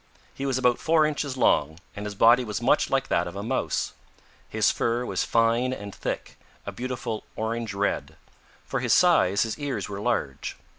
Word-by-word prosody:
He 140 - -4
was 130 -2 0
about 125 -2 +2
four 160 -1 +3
inches 145 -3 -2
long, 80 - +2 0.2
and 105 +1 -5
his 105 - -6
body 120 +4 +6
was 105 -3 -3
much - - +2
like - - +1
that 90 +1 +1
of 85 - -8
a 100 - -4
Mouse. 130 +4 -1 0.6
His - - +2
fur 120 +1 -1
was - - -1
fine 115 +2 +2
and 100 -5 -7
thick, - - -5 0.3
a - - -4
beautiful 120 -3 -4
orange 110 -1 -3
red. 100 +1 -2 0.5
For - - -2
his - - +2
size 100 +3 +4
his 115 +5 -4
ears 145 -2 -3
were 100 0 -5
large. 90 - -2
115 Hz, 185 wpm, -26 LUFS, 100-130 Hz, 0.6 s, body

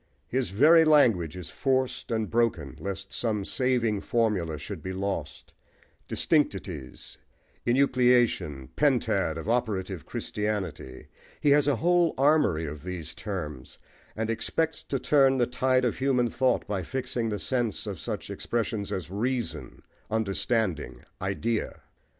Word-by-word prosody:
His 130 0 -1
very 155 - +6
language 115 - +4
is 90 -3 -6
forced 130 -1 -1
and 110 -2 0
broken 100 - 0
lest 100 0 -5
some 105 -4 -1
saving 120 -5 +1
formula 100 -9 0
should 75 - -7
be 95 - -5
lost 95 -5 -4 0.6
distinctities, 95 - -1 0.5
enucleation, 120 - +2
pentad 80 0 +2
of 80 - -6
operative 100 -7 -1
Christianity; 100 -11 -4 0.3
he 145 - +3
has 145 0 +5
a 145 - +3
whole 175 +3 +2
armoury 135 - +3
of 75 -1 -7
these 85 -3 -5
terms, 80 -8 -6 0.4
and 110 +1 -1
expects 160 +8 -1
to 135 - -2
turn 135 0 +4
the 120 - +3
tide 130 +1 +1
of 120 - 0
human 130 -3 +2
thought 130 -2 +1
by 100 -2 -2
fixing 125 +2 -2
the 105 - -2
sense 120 -2 -1
of - - -5
such - - -5
expressions 110 -3 -2
as 90 -1 -4
"reason," 110 - -3 0.3
"understanding," 100 - -1 0.2
"idea." 105 +4 -2
110 Hz, 130 wpm, -27 LUFS, 95-130 Hz, 0.6 s, very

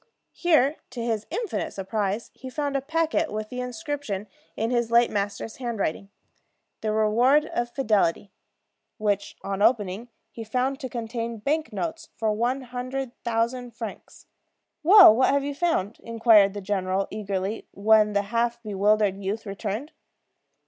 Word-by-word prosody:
Here, 310 -4 +3
to 250 -2 -6
his 220 -2 -2
infinite 465 -5 -3
surprise, 200 +2 -2
he 260 - -9
found 285 +1 -2
a 275 - +1
packet 320 +2 0
with 215 0 -4
the 250 - -6
inscription, 245 -4 -4 0.3
in 225 +2 -1
his 240 -2 +1
late 235 +1 +4
master's 205 +2 -3
handwriting, 210 -6 -3 0.7
"The 215 - -1
Reward 235 +8 +3
of 240 -5 -2
Fidelity," 210 -7 +1 0.7
which, 205 -3 -1
on 195 0 -3
opening, 215 0 +1 0.2
he 230 - -7
found 255 +5 -1
to 260 -4 -5
contain 230 -1 -4
bank 305 +8 -1
notes 330 -1 -4
for 220 -1 0
one 245 +5 0
hundred 255 +1 -5
thousand 235 +1 -1
francs. 225 -3 -8 0.6
"Well, 360 - +9
what 260 +2 +3
have 280 0 +2
you 285 0 -3
found?" 280 - -1
inquired 225 -4 +4
the 205 - -4
general, 190 -1 -1
eagerly, 200 0 -3
when 210 +1 +3
the 200 0 +2
half 235 +3 -1
bewildered 205 -1 +2
youth 210 +4 -3
returned. 210 +7 -4
230 Hz, 145 wpm, -25 LUFS, 205-260 Hz, 0.7 s, Well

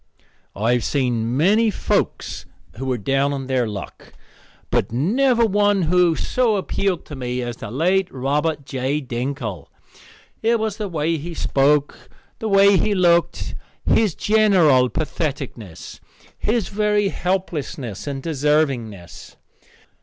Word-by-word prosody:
I 115 +4 +1
have 120 -2 0
seen 120 -3 0
many 210 +9 +4
folks 205 - -2 0.3
who 135 +2 -4
were 130 -1 0
down 135 +5 0
on 135 -1 -4
their 130 -2 0
luck, 105 -3 -8 0.6
but - - +1
never 235 - +2
one 205 -2 +2
who 175 0 +3
so 240 +2 +1
appealed 195 -2 -1
to 150 - -8
me 125 -1 -3
as 120 -1 -5
the 115 - -7
late 180 - +1
Robert 145 +3 -1
J. 135 +2 -2
Dinkle. 120 - -4 0.7
It 230 +1 +2
was 215 -2 -2
the 210 -2 -3
way 165 0 0
he 170 +3 -7
spoke, 145 +1 +1 0.3
the 220 - -3
way 195 0 +6
he 210 +1 +1
looked, 170 -2 +2 0.3
his 210 -7 +2
general 180 -12 +4
patheticness, 140 - -5 0.4
his 220 -1 -1
very 210 0 +1
helplessness, 155 - -3
and 135 -1 -4
deservingness. 135 - -1
150 Hz, 130 wpm, -21 LUFS, 130-195 Hz, 0.7 s, way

